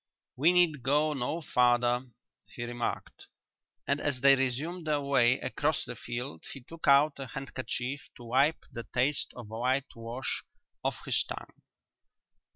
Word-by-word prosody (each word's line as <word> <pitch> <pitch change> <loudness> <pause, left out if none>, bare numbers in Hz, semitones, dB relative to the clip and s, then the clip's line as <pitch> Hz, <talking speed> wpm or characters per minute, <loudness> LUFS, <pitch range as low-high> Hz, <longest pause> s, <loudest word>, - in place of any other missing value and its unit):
"We 155 +7 +5
need 175 -6 +3
go 150 +4 +2
no 150 +5 -2
farther," 125 -2 +2 0.4
he 120 - -7
remarked, 120 0 -4 0.6
and 140 +1 +1
as 135 -4 -1
they 140 +1 +8
resumed 145 +7 -2
their 150 -1 +2
way 130 -3 +3
across 150 0 0
the 125 - -5
field 120 -7 -6
he 135 - -9
took 165 +6 -9
out 140 +1 +5
a 135 - -5
handkerchief 135 +1 -4
to 120 - -12
wipe 135 +7 +2
the 115 -1 -7
taste 135 +4 +1
of 120 -4 -9
whitewash 120 +1 -2 0.4
off - - -2
his - - +2
tongue. - - -7
130 Hz, 145 wpm, -30 LUFS, 120-145 Hz, 0.6 s, they